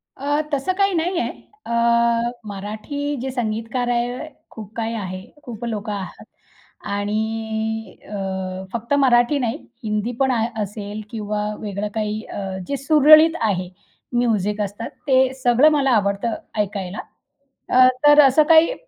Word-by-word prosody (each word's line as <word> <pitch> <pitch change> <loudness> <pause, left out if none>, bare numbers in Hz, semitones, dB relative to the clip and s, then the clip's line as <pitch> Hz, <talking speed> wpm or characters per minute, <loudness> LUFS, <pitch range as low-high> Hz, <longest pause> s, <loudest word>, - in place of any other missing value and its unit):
अ, 290 +2 0
तसं 285 +7 0
काही 395 -1 +2
नाही 345 +2 0
आहे.अ, 420 - -7 0.8
मराठी 215 +9 -4
जे 265 0 -3
संगीतकार 235 +1 -2
आहे, 245 +4 -1 0.2
खूप 215 -1 -10
काही 230 0 -2
आहे, 185 -3 -5 0.2
खूप 240 -2 -7
लोकं 215 -2 -3
आहात. 195 -2 -7 0.6
आणि 220 +1 -2
अ, 190 -2 -4
फक्त 235 +4 -2
मराठी 250 +2 +4
नाही, 235 -2 -1 0.3
हिंदी 215 +2 -1
पण 265 -1 +3
आह 230 -2 +1 0.2
असेल 205 +1 -6
किंवा 210 -2 -3 0.2
वेगळं 205 0 -4
काही 215 0 -2
अ, 190 -1 -5
जे 280 - -2
सुरळीत 310 +3 +6
आहे 185 -5 0 0.4
म्युझिक 210 -4 +1
असतात, 205 +3 -4 0.2
ते 265 -1 +4
सगळं 245 +5 +5
मला 275 -3 +2
आवडतं 205 0 +1 0.2
ऐकायला. 195 -1 -2 0.7
अ, 255 0 +7 0.2
तर 295 0 +8
असं 280 +2 +5
काही 325 +8 +6
225 Hz, 135 wpm, -21 LUFS, 205-265 Hz, 0.8 s, तर